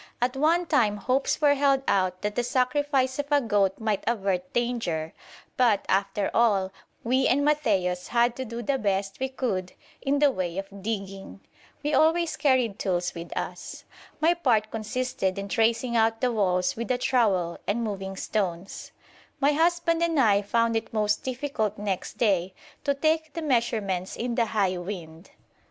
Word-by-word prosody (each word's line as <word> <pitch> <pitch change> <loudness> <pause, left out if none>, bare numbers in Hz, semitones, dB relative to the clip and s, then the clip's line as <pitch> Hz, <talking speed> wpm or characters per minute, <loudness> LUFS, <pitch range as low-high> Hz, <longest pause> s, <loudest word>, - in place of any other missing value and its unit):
At 250 +2 0
one 325 +5 +2
time 210 -9 +2
hopes 255 +6 0
were 290 -1 +5
held 275 -1 +2
out 185 -1 +1
that 210 0 -1
the 245 - 0
sacrifice 260 +1 +1
of 285 - -2
a 290 - +5
goat 205 -6 +1
might 215 -3 -1
avert 195 -5 -1
danger, 225 -10 -2 0.4
but, 230 -6 +3
after 195 +1 0
all, 200 -5 +2 0.3
we 260 +3 +2
and 285 +3 +2
Matthaios 195 -12 +1
had 240 0 +2
to 260 - -3
do 235 0 -6
the 270 +4 0
best 195 -2 -1
we 265 0 -1
could 200 -9 -3 0.3
in 280 +1 +1
the 285 -1 +4
way 180 -6 -3
of 195 0 -6
digging. 195 -2 -5 0.4
We 295 +1 -1
always 320 +3 +3
carried 255 -8 +1
tools 180 -2 -1
with 170 0 -8
us. - - -5 0.4
My 325 +3 +4
part 235 -11 +1
consisted 225 -3 -2
in 200 0 -4
tracing 230 +3 +1
out 225 0 +2
the 250 0 +1
walls 180 -4 +1
with 230 +1 -4
the 255 - +1
trowel 200 -10 +1
and 230 +3 0
moving 195 -3 -4
stones. 190 -3 -3 0.5
My 280 +1 +4
husband 335 +1 +2
and 335 -3 +1
I 205 -5 +4
found 230 +3 +1
it 225 - -2
most 210 -1 +1
difficult 255 -5 -2
next 200 -3 -4
day 190 -5 +1 0.3
to 280 - +2
take 315 +1 0
the 330 - -4
measurements 220 -9 0
in 240 +1 -3
the 235 0 +2
high 195 -4 0
wind. 175 -2 -8
225 Hz, 170 wpm, -26 LUFS, 195-265 Hz, 0.5 s, were